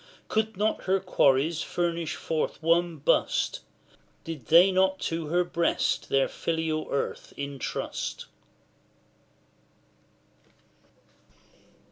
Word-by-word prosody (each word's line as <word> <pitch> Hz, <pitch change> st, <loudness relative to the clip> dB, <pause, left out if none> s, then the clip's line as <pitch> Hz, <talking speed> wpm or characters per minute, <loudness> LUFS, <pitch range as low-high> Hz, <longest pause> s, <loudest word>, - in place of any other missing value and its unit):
Could 220 Hz, -1 st, 0 dB
not 215 Hz, +2 st, 0 dB
her 190 Hz, +1 st, +2 dB
quarries 155 Hz, -3 st, +2 dB
furnish 170 Hz, -2 st, -2 dB
forth 160 Hz, -1 st, -2 dB
one 170 Hz, 0 st, +2 dB
bust? 140 Hz, -, +1 dB, 0.6 s
Did 155 Hz, -8 st, -7 dB
they 175 Hz, +4 st, +7 dB
not 190 Hz, 0 st, +2 dB
to 165 Hz, -1 st, -2 dB
her 175 Hz, +3 st, +2 dB
breast 170 Hz, -1 st, 0 dB
their 135 Hz, 0 st, +3 dB
filial 160 Hz, -1 st, -2 dB
earth 140 Hz, -, -3 dB
entrust? 140 Hz, -2 st, -4 dB
165 Hz, 90 wpm, -27 LUFS, 155-180 Hz, 0.6 s, they